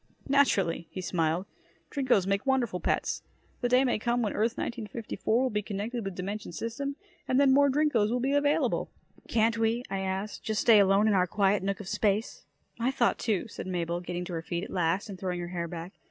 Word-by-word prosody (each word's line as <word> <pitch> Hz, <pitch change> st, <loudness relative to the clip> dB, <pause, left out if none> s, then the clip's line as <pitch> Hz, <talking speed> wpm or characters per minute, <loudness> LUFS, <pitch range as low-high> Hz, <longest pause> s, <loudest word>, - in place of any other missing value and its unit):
"Naturally," 195 Hz, -, +2 dB
he -, -, -7 dB
smiled. 170 Hz, 0 st, 0 dB, 0.5 s
"Drinkos 260 Hz, -9 st, +2 dB
make 195 Hz, +1 st, 0 dB
wonderful 255 Hz, -8 st, +1 dB
pets. -, -, -1 dB, 0.4 s
The 245 Hz, -, +1 dB
day 250 Hz, +2 st, +5 dB
may 245 Hz, -5 st, +1 dB
come 240 Hz, +2 st, 0 dB
when 210 Hz, -, -1 dB
Earth 230 Hz, +4 st, 0 dB
1954 230 Hz, 0 st, -2 dB
will 260 Hz, -, +1 dB
be 210 Hz, 0 st, 0 dB
connected 210 Hz, +4 st, -4 dB
with 195 Hz, -2 st, -5 dB
dimension 200 Hz, +2 st, -5 dB
system 230 Hz, -, -4 dB, 0.3 s
and 255 Hz, -, +2 dB
then 275 Hz, -2 st, +5 dB
more 285 Hz, +1 st, +5 dB
Drinkos 265 Hz, -7 st, +2 dB
will 245 Hz, +2 st, 0 dB
be 270 Hz, +3 st, 0 dB
available." 285 Hz, 0 st, +1 dB, 0.4 s
"Can't 230 Hz, 0 st, +2 dB
we," 225 Hz, +2 st, +1 dB
I 195 Hz, -, -1 dB
asked, 190 Hz, +2 st, -3 dB
"just 220 Hz, -1 st, 0 dB
stay 225 Hz, -3 st, +7 dB
alone 200 Hz, +2 st, +4 dB
in 215 Hz, -, +3 dB
our 185 Hz, -2 st, +3 dB
quiet 200 Hz, +2 st, +2 dB
nook 195 Hz, +1 st, -2 dB
of 205 Hz, -, -8 dB
space?" 210 Hz, +1 st, -1 dB, 0.3 s
"My 235 Hz, +2 st, +1 dB
thought, 250 Hz, -3 st, +1 dB
too," 215 Hz, -2 st, 0 dB
said 210 Hz, -, -7 dB
Mabel, 175 Hz, -1 st, -2 dB
getting 180 Hz, 0 st, -4 dB
to 175 Hz, -, -6 dB
her 165 Hz, -, -2 dB
feet 170 Hz, +1 st, -3 dB
at -, -, -7 dB
last 180 Hz, +2 st, 0 dB
and 195 Hz, -3 st, -8 dB
throwing 180 Hz, -1 st, -2 dB
her 175 Hz, 0 st, -5 dB
hair 170 Hz, -1 st, -3 dB
back. 170 Hz, +2 st, -7 dB
210 Hz, 210 wpm, -29 LUFS, 185-240 Hz, 0.5 s, stay